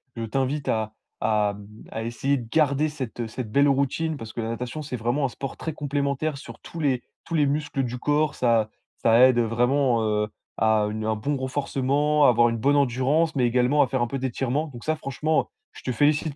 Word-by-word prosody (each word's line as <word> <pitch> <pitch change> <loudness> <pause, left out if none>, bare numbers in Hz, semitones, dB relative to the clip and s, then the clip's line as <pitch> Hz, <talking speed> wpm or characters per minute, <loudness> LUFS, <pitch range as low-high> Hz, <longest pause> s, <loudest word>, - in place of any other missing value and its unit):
je 115 - -4
t'invite 135 +5 -1
à 110 -1 -1 0.3
à 105 -2 +1
hem, 100 -1 -12 0.2
à 110 - -4
essayer 135 +5 0
de 120 -3 -7
garder 150 +1 +2
cette 125 -5 -5
cette 110 -1 -6
belle 140 +4 +4
routine, 140 +3 0
parce 115 -4 -8
que 120 - -3
la 110 - -3
natation, 125 +5 -4
c'est 140 -3 -5
vraiment 120 +5 0
un - - 0
sport 135 +2 -6
très 160 - -4
complémentaire 145 0 -2
sur - - -11
tous 170 - -9
les 135 -5 +1 0.2
tous 165 - -7
les 150 -2 +4
muscles 145 -1 -1
du 125 0 -3
corps. 150 +3 +1
Ça 115 -3 +2 0.3
ça 115 0 +4
aide 130 -1 +6
vraiment, 120 +1 +2
heu, 105 -1 +1 0.3
à 110 -1 +3
une 110 0 -4
un 110 0 +1
bon 140 +7 -2
renforcement, 140 +2 +1
avoir 120 -2 +5
une 115 - -2
bonne 140 +6 +2
endurance, 140 +4 +2
mais 130 -3 +2
également 125 +4 +3
à - - +4
faire 130 -1 -1
un 120 - +1
peu 135 +3 -4
d'étirements. 135 +4 -1
Donc 120 -5 -11
ça 155 - 0
franchement, 155 +1 0
heu, - - -20 0.3
je - - -13
te 130 - -2
félicite 145 +3 +1
130 Hz, 215 wpm, -25 LUFS, 115-145 Hz, 0.3 s, aide